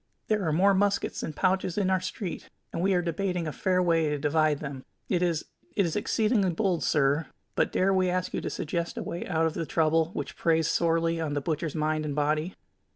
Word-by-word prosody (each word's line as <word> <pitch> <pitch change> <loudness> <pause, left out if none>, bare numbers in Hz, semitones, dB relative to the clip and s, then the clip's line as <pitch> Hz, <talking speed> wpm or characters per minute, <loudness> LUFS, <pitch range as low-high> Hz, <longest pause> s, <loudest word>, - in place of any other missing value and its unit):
There 215 -2 +2
are - - +2
more 190 +6 +4
muskets 200 +1 +1
than 155 - -4
pouches 185 +1 0
in 190 -2 +2
our 190 - +3
street, 185 -1 -5 0.2
and 165 - -2
we 190 +1 +3
are 175 - +1
debating 175 0 -1
a 155 - -2
fair 185 +3 +1
way 165 -3 +2
to 150 - -1
divide 155 +1 +2
them. 140 -3 -6 0.3
It 180 -2 +1
is 170 -3 0 0.3
it 200 - +3
is 165 - -2
exceeding 215 +1 +2
bold, 185 -3 +1
sir, 145 +1 +2 0.3
but - - +1
dare 195 +1 +2
we 185 -1 +2
ask 180 0 -1
you - - -1
to - - -3
suggest 170 +2 -3
a - - -2
way 170 - -5
out 165 -2 +1
of 160 - 0
the 165 - -2
trouble 160 0 +3
which - - -5
preys 165 -1 +2
sorely 165 0 +1
on 150 -2 -2
the - - +1
butcher's 155 +1 -2
mind 155 0 0
and 145 -2 -3
body?" 155 +4 0
165 Hz, 220 wpm, -28 LUFS, 155-185 Hz, 0.3 s, more